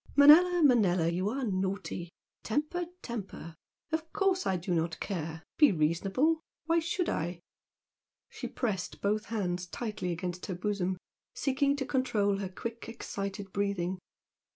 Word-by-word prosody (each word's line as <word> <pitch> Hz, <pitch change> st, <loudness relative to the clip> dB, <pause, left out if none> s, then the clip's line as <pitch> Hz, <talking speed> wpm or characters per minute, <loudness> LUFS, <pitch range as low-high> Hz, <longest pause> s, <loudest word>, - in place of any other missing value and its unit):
"Manella, 335 Hz, +5 st, +8 dB
Manella, 190 Hz, -, +4 dB
you 185 Hz, +4 st, 0 dB
are 265 Hz, +4 st, -2 dB
naughty! 190 Hz, -4 st, -2 dB, 0.3 s
Temper, 305 Hz, +9 st, -1 dB, 0.2 s
temper! 200 Hz, -8 st, -6 dB, 0.4 s
Of 320 Hz, 0 st, -2 dB
course 385 Hz, -2 st, +2 dB
I 190 Hz, -, +2 dB
do 180 Hz, +1 st, -2 dB
not 165 Hz, 0 st, 0 dB
care! 160 Hz, -4 st, -4 dB, 0.2 s
Be 300 Hz, -2 st, +8 dB
reasonable! 195 Hz, -, +2 dB, 0.2 s
Why 330 Hz, +1 st, +3 dB
should 335 Hz, +2 st, -1 dB
I?" 170 Hz, +2 st, -2 dB, 0.9 s
She -, -, -6 dB
pressed 200 Hz, -7 st, -3 dB
both 210 Hz, +2 st, +1 dB
hands 180 Hz, -5 st, -2 dB
tightly 210 Hz, -3 st, -3 dB
against 180 Hz, +1 st, -4 dB
her 185 Hz, -, -3 dB
bosom, 190 Hz, -1 st, -1 dB, 0.4 s
seeking 280 Hz, 0 st, +2 dB
to 275 Hz, -2 st, -2 dB
control 215 Hz, -7 st, +1 dB
her 195 Hz, -2 st, -3 dB
quick, 230 Hz, +4 st, -6 dB
excited 200 Hz, -3 st, -5 dB
breathing. 190 Hz, -2 st, -1 dB
200 Hz, 135 wpm, -31 LUFS, 180-270 Hz, 0.9 s, Manella